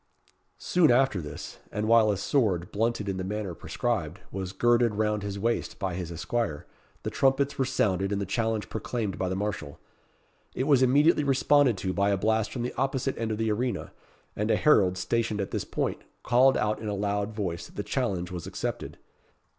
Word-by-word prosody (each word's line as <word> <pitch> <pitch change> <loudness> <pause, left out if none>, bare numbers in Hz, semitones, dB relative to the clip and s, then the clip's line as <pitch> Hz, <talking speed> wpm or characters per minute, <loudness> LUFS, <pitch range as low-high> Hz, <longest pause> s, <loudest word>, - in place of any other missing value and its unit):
Soon 175 -4 +3
after 120 -6 +3
this, 75 -2 -8
and 105 +1 -2
while 115 -1 +5
a 100 - +1
sword, 95 -6 0
blunted 115 0 -1
in 95 -1 -2
the 95 - -3
manner 100 -1 -3
prescribed, - - -2
was 95 -1 -4
girded 120 +2 +3
round 105 0 0
his 100 0 -4
waist 115 +3 -1
by 95 -3 -2
his 85 -1 -5
esquire, 85 -2 -2 0.4
the - - -3
trumpets 135 +1 +1
were 135 - +3
sounded, 95 -6 0
and 100 - 0
the 100 - -2
challenge 110 +2 -1
proclaimed 110 -3 -3
by 95 - 0
the 95 - -1
marshal. 95 -8 -4 0.8
It 130 - 0
was 140 -2 +4
immediately 145 +5 +4
responded 135 -3 +3
to 95 0 -2
by 100 +1 +2
a 100 - +2
blast 110 +2 +1
from 120 - -3
the 125 - -3
opposite 135 0 0
end 115 -1 -1
of 110 - -2
the 110 0 0
arena, 120 -1 -2 0.4
and 105 +1 -1
a - - +4
herald, 95 -12 +4
stationed 110 +2 -1
at 100 - -3
this - - -2
point, - - -2 0.2
called 130 +2 +4
out 105 0 0
in 110 - -6
a 105 - -1
loud 100 +1 -2
voice 85 -5 -3
that - - -19
the 105 - -3
challenge 100 -10 -2
was 90 -2 -6
accepted. - - -4
105 Hz, 195 wpm, -27 LUFS, 95-120 Hz, 0.8 s, while